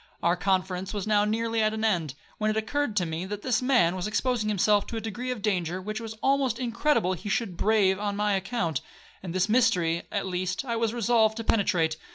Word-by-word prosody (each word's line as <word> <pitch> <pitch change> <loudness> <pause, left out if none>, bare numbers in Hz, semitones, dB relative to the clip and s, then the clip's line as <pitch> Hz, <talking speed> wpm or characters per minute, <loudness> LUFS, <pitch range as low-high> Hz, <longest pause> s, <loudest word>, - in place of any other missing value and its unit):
Our 170 +1 +3
conference 185 +1 -1
was 200 - -2
now 210 -1 +3
nearly 225 +1 0
at 215 0 +1
an 220 0 -1
end, 165 -10 0 0.2
when 215 0 +1
it 215 - 0
occurred 225 +2 -1
to 185 -4 +2
me 160 +1 -3
that 205 +1 -6
this 250 -3 +1
man 245 -10 +3
was 185 +1 -3
exposing 220 0 0
himself 205 0 +2
to 230 - -5
a - - -1
degree 225 +3 -5
of 245 -5 -4
danger 185 -4 0
which 215 +3 -4
it - - -9
was 220 -1 -6
almost 270 -4 +2
incredible 235 -5 +1
he 185 +3 -6
should 200 -3 -1
brave 195 -1 +2
on 205 -1 -2
my 210 0 +1
account; 190 - -1 0.4
and 185 - -6
this 185 +1 +2
mystery, 200 -8 +2
at 200 - -1
least, 185 +4 -2
I 235 -2 -2
was 230 -1 0
resolved 230 -2 +2
to 230 - -3
penetrate. 170 -8 +1
210 Hz, 220 wpm, -27 LUFS, 185-230 Hz, 0.4 s, Our